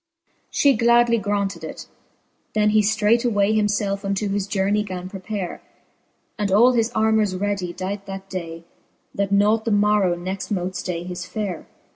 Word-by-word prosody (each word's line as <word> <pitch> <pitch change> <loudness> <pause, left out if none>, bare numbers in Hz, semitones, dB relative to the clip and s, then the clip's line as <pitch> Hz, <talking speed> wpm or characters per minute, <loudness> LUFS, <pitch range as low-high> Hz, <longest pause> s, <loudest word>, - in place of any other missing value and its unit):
XVI. 330 0 -46
She 280 -1 +3
gladly 235 0 +4
graunted 205 -1 -2
it; - - -7 0.7
then 210 0 +3
he 215 0 +4
ftraight 215 +2 +2
way 205 0 +2
Himlelfe 205 -1 0
unto 200 +1 -1
his 200 0 -1
journey 200 +1 +1
gan 185 -3 -5
prepare, 190 -1 -5 0.8
And 205 -2 0
all 230 +6 +6
his 230 -2 +1
armours 220 -3 +2
readie 195 -2 -2
dight 195 +2 -5
that 195 0 -7
day. 165 -3 -6 0.5
That 200 -1 -1
nought 210 +2 +3
the 230 - -1
morrow 205 -3 +3
next 185 +2 -5
mote 185 -3 -2
flay 175 -2 -3
his 180 0 -6
fare. 200 -6 -4
205 Hz, 160 wpm, -22 LUFS, 190-215 Hz, 0.8 s, all